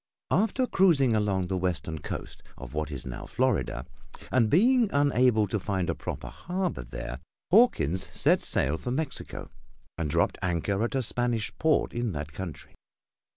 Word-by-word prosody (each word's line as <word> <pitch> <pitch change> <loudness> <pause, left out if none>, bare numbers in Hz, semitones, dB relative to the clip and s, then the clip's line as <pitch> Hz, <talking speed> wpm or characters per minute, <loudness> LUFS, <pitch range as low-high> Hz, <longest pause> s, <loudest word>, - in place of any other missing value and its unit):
After 225 +5 +2
cruising 155 - +4
along 100 -3 +1
the 95 +1 -2
western 80 -3 -2
coast - - -6 0.2
of 65 -2 -9
what 75 0 -2
is 70 -4 -6
now 65 -2 -6
Florida, 95 - 0 0.5
and 115 -4 +3
being 235 - +4
unable 130 -6 +3
to 105 +2 -2
find 95 -3 -1
a - - -1
proper - - -6
harbor 180 - -3
there, 60 +1 -6 0.3
Hawkins 95 - +4
set - - +3
sail 75 +4 0
for - - -5
Mexico 140 +3 -4 0.5
and 80 -3 -1
dropped - - +1
anchor 95 +4 0
at 120 - -1
a 130 - +1
Spanish 120 -1 0
port 160 -1 +2
in 120 -4 -1
that 75 0 -5
country. 85 -4 -7
105 Hz, 155 wpm, -28 LUFS, -, 0.5 s, cruising